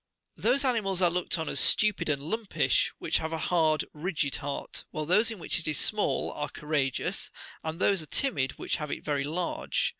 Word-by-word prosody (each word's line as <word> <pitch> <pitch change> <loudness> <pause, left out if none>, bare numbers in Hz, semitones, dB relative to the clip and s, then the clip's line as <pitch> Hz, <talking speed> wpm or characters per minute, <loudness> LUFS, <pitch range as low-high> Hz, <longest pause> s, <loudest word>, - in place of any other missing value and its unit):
Those 275 +1 +2
animals 210 -7 +1
are 175 - +4
looked 180 +1 0
upon 160 -2 -3
as 140 - +2
stupid 210 -6 +4
and 140 -2 0
lumpish 215 +6 +1
which - - +1
have 160 0 -4
a 165 - -2
hard, 160 -2 +2
rigid 155 -3 -1
heart, 140 0 -4
while 155 - -4
those 210 +8 +4
in 225 - -5
which 170 - -1
it 160 - -5
is 150 -2 0
small 210 -1 +1
are 145 0 -4
courageous, 145 -3 -1 0.3
and 160 +1 -4
those 195 -2 +3
are 155 - -8
timid 140 - +1
which - - -2
have 150 -3 -5
it - - -5
very 145 -2 0
large. 180 - -1
160 Hz, 200 wpm, -28 LUFS, 150-200 Hz, 0.3 s, are